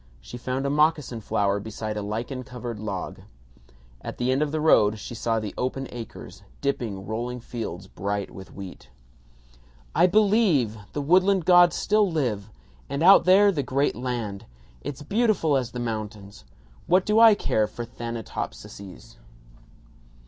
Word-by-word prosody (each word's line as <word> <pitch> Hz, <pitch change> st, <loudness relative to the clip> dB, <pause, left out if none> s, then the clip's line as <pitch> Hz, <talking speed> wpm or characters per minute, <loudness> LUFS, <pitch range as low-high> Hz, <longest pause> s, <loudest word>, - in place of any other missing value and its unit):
She -, -, -11 dB
found 130 Hz, +2 st, -3 dB
a 140 Hz, -, 0 dB
moccasin 150 Hz, -5 st, +1 dB
flower 100 Hz, -1 st, 0 dB
beside 110 Hz, 0 st, -5 dB
a 105 Hz, -, -3 dB
lichen 115 Hz, +6 st, -4 dB
covered 120 Hz, -3 st, -7 dB
log. 100 Hz, -3 st, -5 dB, 0.8 s
At -, -, -7 dB
the 125 Hz, +1 st, 0 dB
end 135 Hz, +2 st, +1 dB
of 150 Hz, -1 st, 0 dB
the 155 Hz, -, -1 dB
road 110 Hz, -9 st, +4 dB
she 105 Hz, -, -8 dB
saw 115 Hz, 0 st, -1 dB
the 105 Hz, -2 st, -5 dB
open 130 Hz, +1 st, -2 dB
acres 120 Hz, -2 st, -9 dB, 0.2 s
dipping 115 Hz, -9 st, -2 dB
rolling 120 Hz, +4 st, -4 dB
fields 110 Hz, -7 st, -6 dB
bright 100 Hz, +1 st, -4 dB
with 95 Hz, 0 st, -11 dB
wheat. 95 Hz, -2 st, -10 dB, 1.0 s
"I 175 Hz, -, +5 dB
believe! 195 Hz, -, +3 dB, 0.2 s
The 145 Hz, -, -2 dB
woodland 185 Hz, +3 st, +3 dB
gods 175 Hz, -2 st, +6 dB
still 210 Hz, -2 st, +2 dB
live! 115 Hz, -10 st, -1 dB, 0.4 s
And 140 Hz, +3 st, -2 dB
out 185 Hz, -1 st, +8 dB
there, 200 Hz, +2 st, +6 dB
the 155 Hz, -7 st, -1 dB
great 135 Hz, +2 st, 0 dB
land. 120 Hz, -6 st, -4 dB, 0.3 s
It's 145 Hz, -, -6 dB
beautiful 200 Hz, -4 st, +2 dB
as 130 Hz, -3 st, 0 dB
the 120 Hz, +1 st, -6 dB
mountains. 105 Hz, -3 st, -6 dB, 0.4 s
What 185 Hz, +1 st, +4 dB
do 210 Hz, +1 st, +3 dB
I 225 Hz, -2 st, +8 dB
care 110 Hz, -, 0 dB
for 120 Hz, -, -7 dB
Thanatopsises?" 110 Hz, -, -7 dB
125 Hz, 150 wpm, -25 LUFS, 105-155 Hz, 1.0 s, out